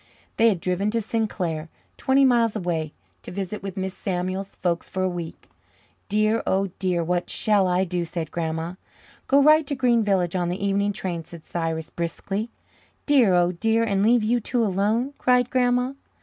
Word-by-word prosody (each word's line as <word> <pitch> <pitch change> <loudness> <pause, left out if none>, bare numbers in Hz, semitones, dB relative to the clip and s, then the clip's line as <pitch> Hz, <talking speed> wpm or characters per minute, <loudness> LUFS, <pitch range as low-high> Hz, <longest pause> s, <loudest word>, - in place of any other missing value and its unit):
They 230 0 +6
had 195 -5 0
driven 185 +4 0
to 230 +2 0
Sinclair, 190 -8 -2 0.3
twenty 270 +1 +3
miles 235 -4 +3
away, 170 -6 -2 0.3
to - - -10
visit 195 +2 -4
with 195 -1 -6
Mrs. 190 0 -3
Samuel's 185 +1 -3
folks 170 -2 -2
for 185 - -2
a - - +2
week. 175 -3 -6 0.6
"Dear, 215 +2 +2
oh 195 0 +1
dear, 180 -3 0
what 175 +1 -1
shall 205 -3 +2
I 180 +1 +2
do?" 180 -1 -2
said 165 -1 -5
Grandma. 165 0 -3 0.5
"Go 280 +1 +5
right 305 0 +5
to 285 - -2
Green 245 -3 +3
Village 190 -4 +1
on 175 -1 0
the 185 +3 -3
evening 200 +1 +1
train," 180 -5 -4
said 165 0 -12
Cyrus 165 -1 -3
briskly. 195 +6 -3 0.6
"Dear, 250 -11 +4
oh 175 0 +3
dear, 225 +6 +1
and 200 -3 +1
leave 230 +2 +4
you 240 +3 +2
two 235 +1 0
alone!" 215 +7 0
cried 250 -1 +3
Grandma. 250 0 +2
195 Hz, 180 wpm, -24 LUFS, 175-230 Hz, 0.6 s, They